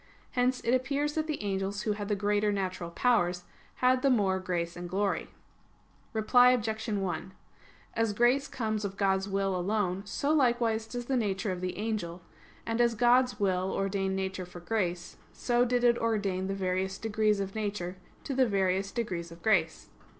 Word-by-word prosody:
Hence 250 0 +1
it 235 - +1
appears 280 +3 0
that 315 0 -1
the 305 -8 -3
angels 200 +1 -2
who 215 - 0
had 205 -1 -3
the 205 - +1
greater 205 +1 +1
natural 185 -3 -3
powers, 180 -3 +1 0.3
had 255 0 +3
the 275 - +3
more 200 -6 +2
grace 175 -2 -2
and 175 0 -6
glory. 195 +2 -1 0.8
Reply 245 +3 +5
Obj. 220 -2 -2
1: 190 -3 -2 0.6
As 225 -1 +1
grace 240 +6 +3
comes 215 -3 -2
of 195 -1 -4
God's 195 0 +1
will 195 -1 0
alone, 185 0 0
so 280 +9 0
likewise 235 -5 +2
does 245 +1 -5
the 265 - 0
nature 205 -4 0
of 180 -1 -4
the 185 0 -3
angel: 195 -5 -3 0.4
and 230 +1 0
as 235 -1 +3
God's 245 0 +3
will 190 -1 +1
ordained 195 -1 -1
nature 190 -1 -3
for 180 0 -10
grace, 175 -2 -2 0.2
so 240 0 +1
did 245 0 +1
it 240 -1 +4
ordain 200 -5 0
the 195 - -2
various 190 0 -1
degrees 215 -1 +1
of 195 0 -3
nature 200 -4 -3 0.3
to 275 - -3
the 260 -1 +3
various 195 -1 +1
degrees 175 -8 -3
of 170 0 -13
grace. 175 -7 +1
205 Hz, 175 wpm, -30 LUFS, 190-235 Hz, 0.8 s, Reply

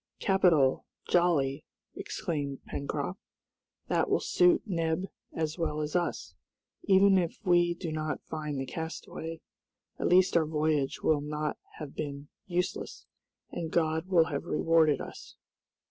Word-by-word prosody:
"Capital, 170 -9 +3 0.2
jolly!" 155 -5 +2 0.3
exclaimed 140 -4 -4
Pencroft. 145 +6 -4 0.7
"That - - +1
will - - +3
suit 360 -2 +3
Neb 165 -2 -1 0.3
as 160 +1 -3
well 155 -2 -1
as 150 +1 -3
us. 170 - -1 0.5
Even 195 0 +6
if 170 -2 -2
we 175 -1 +4
do 170 -2 -5
not 155 -1 -3
find 150 -3 -4
the 135 - -2
castaway, 160 +2 -6 0.6
at - - 0
least 185 0 +4
our 160 -2 +4
voyage 150 -3 0
will 155 -2 +3
not 150 0 -3 0.2
have 150 -3 -7
been 145 -1 -5 0.2
useless, 180 0 -3 0.5
and 165 -2 -4
God 160 +1 0
will 175 -4 +5
have 140 -3 -4
rewarded 160 -2 +3
us." - - -10
160 Hz, 130 wpm, -30 LUFS, 150-175 Hz, 0.7 s, Even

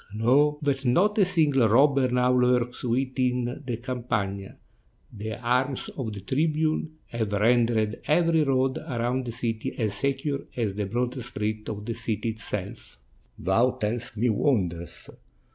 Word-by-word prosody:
Know 140 +7 +3
that 140 -1 0
not 180 +12 +3
a 200 - +6
single 145 -9 +3
robber 135 +3 +4
now 125 0 +2
lurks 125 -1 +2
within 125 +1 0
the 120 -3 -2
Campagna; 115 -6 -3 0.6
the 110 0 -5
arms 125 +2 0
of 115 -6 -5
the 100 - -7
tribune 155 - 0 0.2
have 110 -3 -2
rendered 115 0 +2
every 165 0 +3
road 130 -1 +1
around 125 +1 -2
the - - -2
city 115 +1 -3
as 110 -4 0
secure 140 +4 -1 0.2
as 110 -5 0
the 105 0 -3
broadest 120 +2 -2
street 110 -1 -3
of 105 -1 -5
the 115 - -2
city 115 0 -2
itself." 105 - -6 0.4
43 - - -12
ITALY - - -11
"Thou 115 +7 +3
tellest 115 +2 -3
me 120 +4 +2
wonders." 90 - -1
120 Hz, 150 wpm, -26 LUFS, 110-135 Hz, 0.6 s, a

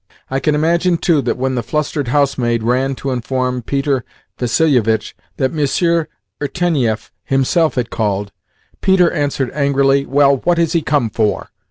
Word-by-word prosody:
I 135 - 0
can 150 +3 +1
imagine, 170 +3 +2
too, 165 -4 +2
that - - -2
when 130 +1 -1
the 125 - -1
flustered 145 +2 -2
housemaid 120 -4 +1
ran 130 +3 +1
to 135 +1 -4
inform 125 +1 -2
Peter 135 +1 -1 0.4
Vassilievitch 120 -4 +1 0.2
that 130 +1 0
Monsieur 165 +2 +1 0.3
Irtenieff 140 -8 -1
himself 135 +5 +1
had 120 -3 -2
called, 100 -2 -1 0.5
Peter 190 -3 +4
answered 145 -5 -1
angrily, 140 -1 +2
"Well, 140 0 +4
what 175 +6 0
has 165 -1 +1
he 170 - +2
come 145 -7 0
for?" 105 -1 -1
135 Hz, 150 wpm, -17 LUFS, 125-155 Hz, 0.5 s, Peter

